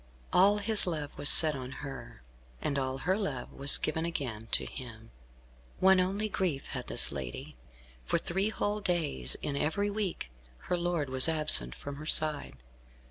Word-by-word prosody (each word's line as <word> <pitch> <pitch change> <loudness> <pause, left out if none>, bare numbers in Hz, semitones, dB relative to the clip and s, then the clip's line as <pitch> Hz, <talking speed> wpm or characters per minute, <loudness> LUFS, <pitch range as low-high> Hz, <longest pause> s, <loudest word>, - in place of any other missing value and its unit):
All 200 +3 +4
his 210 -1 +3
love 150 -4 -5
was 145 - +2
set 155 -2 +7
on 130 -1 -8
her, 135 - -10 0.4
and 140 - -3
all 130 0 -3
her 180 +7 -1
love 195 -11 -5
was 140 0 +5
given 160 +1 -3
again 130 -10 -5
to - - -1
him. 115 -4 -11 0.7
One 190 0 +4
only 195 +4 -2
grief 180 -9 -3
had - - -7
this - - +2
lady. 65 -3 -8 0.5
For - - 0
three 190 +4 -2
whole 210 -1 -3
days 155 - +2
in 145 - -4
every 200 +8 -2
week 200 - -5 0.3
her - - -3
lord 170 -5 -3
was 130 +4 +5
absent 155 - +4
from 140 0 -9
her 155 +1 -10
side. 150 - +2
155 Hz, 165 wpm, -29 LUFS, 130-185 Hz, 0.7 s, set